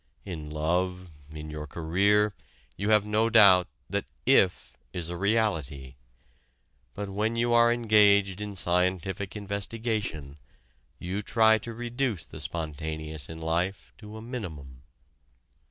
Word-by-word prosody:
In 80 Hz, -6 st, -6 dB
love, 90 Hz, +4 st, -1 dB, 0.2 s
in 75 Hz, 0 st, -8 dB
your 75 Hz, 0 st, -6 dB
career, 100 Hz, +7 st, +2 dB, 0.4 s
you 100 Hz, +2 st, -2 dB
have 105 Hz, -1 st, +4 dB
no 110 Hz, +2 st, +1 dB
doubt 95 Hz, -5 st, +7 dB, 0.2 s
that -, -, -2 dB, 0.2 s
"if" 90 Hz, -2 st, +3 dB, 0.2 s
is 85 Hz, -3 st, -3 dB
a -, -, -4 dB
reality. 85 Hz, -, -1 dB, 1.0 s
But 100 Hz, -1 st, -5 dB
when 105 Hz, +4 st, -1 dB
you 120 Hz, +1 st, +1 dB
are 120 Hz, 0 st, +5 dB
engaged 105 Hz, -4 st, +4 dB
in 105 Hz, -1 st, -5 dB
scientific 90 Hz, +2 st, 0 dB
investigation, 100 Hz, -7 st, -3 dB, 0.6 s
you 95 Hz, +4 st, -4 dB
try 110 Hz, +1 st, +4 dB
to 115 Hz, -, -7 dB
reduce 120 Hz, -, -2 dB
the -, -, -11 dB
spontaneous 80 Hz, -2 st, -3 dB
in 80 Hz, 0 st, -8 dB
life 85 Hz, +4 st, -2 dB
to 105 Hz, 0 st, -10 dB
a 110 Hz, -, -9 dB
minimum. 80 Hz, -, -7 dB
95 Hz, 125 wpm, -27 LUFS, 80-105 Hz, 1.0 s, doubt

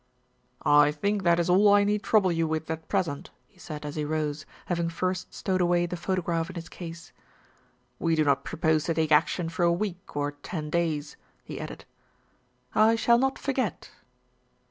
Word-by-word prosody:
"I 145 Hz, 0 st, +6 dB
think 200 Hz, +7 st, -1 dB
that 170 Hz, -1 st, +3 dB
is 170 Hz, -, +1 dB
all 195 Hz, +3 st, +5 dB
I 205 Hz, -, +5 dB
need 205 Hz, 0 st, +1 dB
trouble 200 Hz, -5 st, +3 dB
you 165 Hz, -1 st, 0 dB
with 160 Hz, 0 st, -3 dB
at 160 Hz, 0 st, -5 dB
pres 180 Hz, -, +1 dB
ent," 145 Hz, -2 st, -6 dB, 0.2 s
he 190 Hz, -, -28 dB
said 150 Hz, -4 st, -7 dB
as 145 Hz, -, -5 dB
he 155 Hz, -, -2 dB
rose, 150 Hz, 0 st, -2 dB, 0.2 s
having 170 Hz, -1 st, -1 dB
first 185 Hz, +2 st, -3 dB
stowed 185 Hz, -1 st, -1 dB
away 175 Hz, 0 st, +2 dB
the 175 Hz, -, -4 dB
photograph 170 Hz, -2 st, -1 dB
in 185 Hz, -, -9 dB
his 170 Hz, 0 st, -7 dB
case. 165 Hz, -2 st, -9 dB, 0.9 s
"We 165 Hz, -1 st, +1 dB
do 155 Hz, -, +3 dB
not 140 Hz, -2 st, +2 dB
propose 160 Hz, -1 st, 0 dB
to 165 Hz, -, 0 dB
take 160 Hz, -1 st, 0 dB
action 160 Hz, +3 st, +3 dB
for 175 Hz, +2 st, -4 dB
a 170 Hz, 0 st, +4 dB
week 185 Hz, -1 st, -4 dB
or 145 Hz, 0 st, 0 dB
ten 150 Hz, +1 st, -6 dB
days," 155 Hz, -3 st, -1 dB, 0.3 s
he -, -, -7 dB
added. -, -, -8 dB, 0.9 s
"I 220 Hz, +1 st, +5 dB
shall 235 Hz, +1 st, +4 dB
not 270 Hz, +1 st, +1 dB
forget." 270 Hz, -2 st, -2 dB
170 Hz, 190 wpm, -27 LUFS, 155-185 Hz, 0.9 s, I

